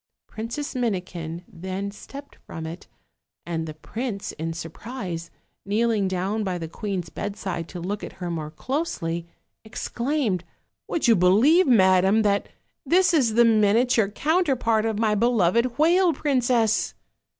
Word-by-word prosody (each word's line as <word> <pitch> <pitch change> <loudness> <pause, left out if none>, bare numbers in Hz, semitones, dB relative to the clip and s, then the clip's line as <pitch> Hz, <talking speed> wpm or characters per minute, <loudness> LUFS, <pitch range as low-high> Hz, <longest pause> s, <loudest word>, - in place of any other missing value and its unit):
Princess 235 +7 -5
Minikin 180 - -3
then 190 +3 -5
stepped 280 +7 -11
from 160 -1 -6
it, 165 +3 -8 0.6
and 165 -1 -3
the 155 - -7
prince, 215 +5 -5
in 165 +1 -4
surprise, 170 - -6 0.3
kneeling 215 0 +1
down 190 +4 -1
by 185 -3 -2
the 165 -2 -5
queen's 190 0 -4
bedside 190 -5 -4
to 180 - -7
look 195 +4 -4
at - - -7
her 175 -2 -5
more 155 -2 -4
closely, 170 - -3 0.4
ex 220 - -6
claimed: 235 - -1 0.4
"Would 325 - 0
you 230 - +6
believe, 225 - +5
madam, 190 -2 +5
that 200 -1 +1 0.3
this 365 +1 +3
is 245 -9 +3
the 235 0 +6
miniature 220 0 +3
counterpart 260 - +1
of 220 -2 -1
my 215 -1 +2
beloved 235 +1 +2
whale 345 +3 +4
princess!" 245 -7 +1
210 Hz, 140 wpm, -24 LUFS, 180-245 Hz, 0.6 s, you